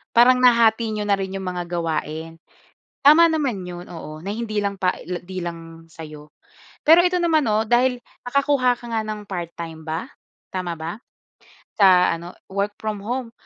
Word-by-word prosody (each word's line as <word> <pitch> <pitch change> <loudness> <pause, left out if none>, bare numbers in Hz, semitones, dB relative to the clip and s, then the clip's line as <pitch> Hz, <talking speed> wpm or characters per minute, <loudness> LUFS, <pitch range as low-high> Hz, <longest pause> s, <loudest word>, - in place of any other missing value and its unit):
Parang 250 +2 +6
nahati 230 -2 +4
niyo 210 -1 -3
na 200 - +4
rin 190 -1 -4
yung 190 -1 -5
mga 180 -1 -4
gawain. 165 -1 -3 0.7
Tama 330 +3 +8
naman 275 -11 -1
’yon, 175 0 -8
oo, 155 -2 -8
na 200 - -2
hindi 220 -1 -4
lang 200 -1 -2
pa 180 0 +1
e - - -13
la 180 0 -4
'di 185 +1 -9
lang 165 -1 -8
sa’yo. 155 -2 -11 0.5
Pero 330 +3 +8
ito 360 0 +2
naman 325 -3 +2
'no, 220 -1 +1
dahil 250 +2 +2 0.3
nakakuha 255 -1 +2
ka 240 - -11
nga 220 - +1
ng 210 -1 -6
part-time 170 -3 -6
ba? 160 +2 -4 0.5
Tama 175 -3 -3
ba? 165 +5 -5 0.8
Sa 185 -3 +6
ano, 170 +2 -9 0.2
work 200 +1 -2
from 215 -2 -4
home. 240 +2 -4
200 Hz, 175 wpm, -22 LUFS, 170-240 Hz, 0.8 s, Tama